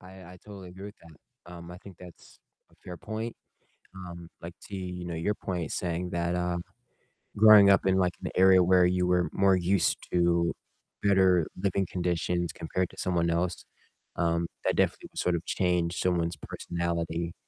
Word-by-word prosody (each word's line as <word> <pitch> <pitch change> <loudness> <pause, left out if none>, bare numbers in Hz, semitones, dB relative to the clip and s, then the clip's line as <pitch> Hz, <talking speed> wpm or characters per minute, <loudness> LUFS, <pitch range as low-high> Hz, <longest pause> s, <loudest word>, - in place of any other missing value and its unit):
I 90 - -14 0.3
I - - -15
totally 100 -3 -10
agree 95 +3 -10
with 105 - -10
that, 85 +2 -18
um, 85 0 -10
I 90 - -10
think 95 -2 -14
that's 90 -2 -15 0.3
a - - -24
fair 90 -1 -7
point, 110 +5 -5 0.6
um, 85 -2 -9
like 85 0 -8
to, 100 - -6
you 90 -1 -6
know, 85 - -4
your 85 +6 -1
point 90 -6 -4
saying 90 0 -3
that, 85 0 -1
uh, 90 0 -1 0.8
growing 105 -2 +8
up 95 - +3
in, 95 - +3
like, 90 -1 +1
an - - -2
area 95 0 +6
where 90 0 +4
you 90 0 +1
were 90 -1 +2
more 95 -1 +4
used 90 +1 +1
to 85 -1 +2 0.5
better 95 -4 +4
living 95 0 -1
conditions 85 -1 -1
compared 90 +2 -3
to - - -18
someone 85 -2 0
else, 85 +1 -2 0.5
um, 85 0 0 0.2
that - - +1
definitely - - 0
would - - -17
sort 90 - +1
of 85 - -4
change 90 -2 0
someone's 85 -2 0
personality 85 -1 -3
90 Hz, 175 wpm, -28 LUFS, 85-95 Hz, 0.8 s, growing